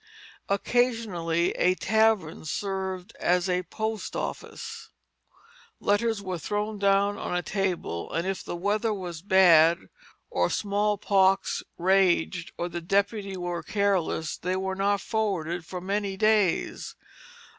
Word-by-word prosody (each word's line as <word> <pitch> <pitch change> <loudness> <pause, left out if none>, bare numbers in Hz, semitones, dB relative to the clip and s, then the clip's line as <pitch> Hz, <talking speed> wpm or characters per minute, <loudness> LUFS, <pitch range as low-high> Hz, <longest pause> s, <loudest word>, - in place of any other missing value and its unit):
Occasionally 200 -6 +1
a 180 +1 +2
tavern 220 -5 +1
served 190 +3 -4
as 180 +1 +2 0.2
post 220 -2 -3
office; 455 -1 -6 0.9
letters 205 0 +1
were 185 -2 -4
thrown 210 +5 -3
down 200 +1 +2
on - - -3
a 180 - 0
table 180 - -2
and 165 +2 -1
if 195 -1 -3
the - - -5
weather 210 +4 0
was 175 -4 -6
bad, 170 -4 +6 0.5
or - - +1
smallpox 200 -2 +1 0.2
raged, 180 -2 +2
or 175 - -2
the 175 0 -5
deputy 200 +2 0
were 175 -1 -3
careless, 190 -4 0
they 180 +1 -2
were 190 0 -2
not 200 +1 +1
forwarded 175 -6 -2
for 180 - -5
many 195 +1 -2
days. 215 -4 +1
195 Hz, 120 wpm, -27 LUFS, 175-205 Hz, 0.9 s, bad